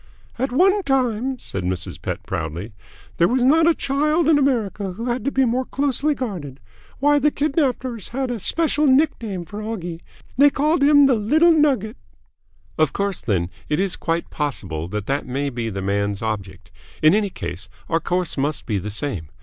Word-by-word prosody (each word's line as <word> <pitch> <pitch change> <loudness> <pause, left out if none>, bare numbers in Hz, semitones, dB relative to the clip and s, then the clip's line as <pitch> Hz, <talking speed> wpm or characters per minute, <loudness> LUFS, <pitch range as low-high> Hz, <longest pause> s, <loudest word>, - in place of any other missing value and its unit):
"At 265 +1 0
one 385 +9 +4
time," 260 - 0
said 95 - -6
Mrs. 90 0 -4
Pett - - -4
proudly, 85 +4 -4 0.4
"there 170 - +4
was 250 +1 +1
not 320 +5 +5
a 335 - +4
child 300 +4 +1
in 310 -2 +5
America 215 -8 0
who 225 +6 -6
had 245 -2 -1
to 275 - +1
be 265 -1 +3
more 250 +2 +1
closely 285 +2 0
guarded. 170 - -5 0.4
Why, 290 +1 +3
the 295 +2 +3
kidnappers 265 - -1
had 260 0 -3
a 235 - -3
special 305 - +1
nick 280 +2 +3
name 195 -6 -5
for 205 +5 -7
Oggie. 175 -7 -5 0.4
They 290 +1 +8
called 300 +3 +1
him 285 0 +7
the 270 - +4
Little 300 +11 +4
Nugget." 275 - +2 0.8
"Of 155 -2 +3
course, 200 -1 -2
then, 90 -5 -1 0.2
it 150 - +1
is 195 -1 0
quite 165 0 -2
possible 95 - -3
that 105 +2 -4
that 140 +2 -2
may 140 +2 -2
be 120 -2 -3
the 95 -2 -5
man's 100 +1 -1
object. 95 -4 -5 0.3
In 155 - +7
any 210 -1 +2
case, 100 - -6 0.2
our 165 - +1
course 175 -2 -2
must 145 0 -1
be 105 -4 -1
the 100 +3 -5
same. 105 - -4
210 Hz, 185 wpm, -22 LUFS, -, 0.8 s, They